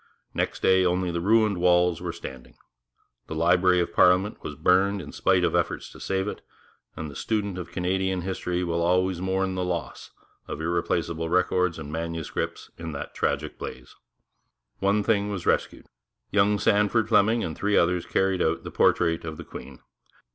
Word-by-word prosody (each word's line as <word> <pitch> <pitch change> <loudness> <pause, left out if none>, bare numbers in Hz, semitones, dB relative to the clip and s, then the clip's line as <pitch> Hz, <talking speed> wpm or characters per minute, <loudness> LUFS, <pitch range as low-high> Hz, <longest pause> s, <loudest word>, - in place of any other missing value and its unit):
Next - - -2
day 95 0 +5
only 90 0 +1
the 85 0 -2
ruined 105 0 +3
walls 90 -1 +3
were 90 -1 -3
standing. 65 -7 -10 0.7
The 80 - -5
Library 90 +2 +3
of 85 - -1
Parliament 90 +3 +3
was 75 - -6
burned 95 +6 +3
in 80 - -8
spite - - +2
of - - +1
efforts - - -1
to - - -13
save 95 +1 -1
it, - - -5 0.5
and 80 - -5
the 70 - -10
student 100 +1 -2
of 90 - -7
Canadian 95 +1 -1
history 90 -1 -2
will 85 -1 -1
always 90 +1 +1
mourn 95 0 0
the 90 0 -2
loss 90 -1 -4 0.4
of - - -5
irreplaceable 85 0 -1
records 90 0 +1
and 75 -2 -7
manuscripts 85 0 -4
in 80 -1 -5
that 70 - -6
tragic 75 +1 -2
blaze. 65 - -8 0.8
One 100 +2 +2
thing 105 -2 +1
was 95 -4 -4
rescued. - - 0 0.5
Young 105 +1 +3
Sandford 105 +3 +2
Fleming 110 +1 +3
and 80 - -4
three 105 0 +1
others 85 0 +2
carried 95 -1 +1
out - - 0
the - - -7
portrait 85 0 +2
of 80 -1 -6
the - - -9
Queen. 65 -2 -10
90 Hz, 170 wpm, -26 LUFS, 85-95 Hz, 0.8 s, day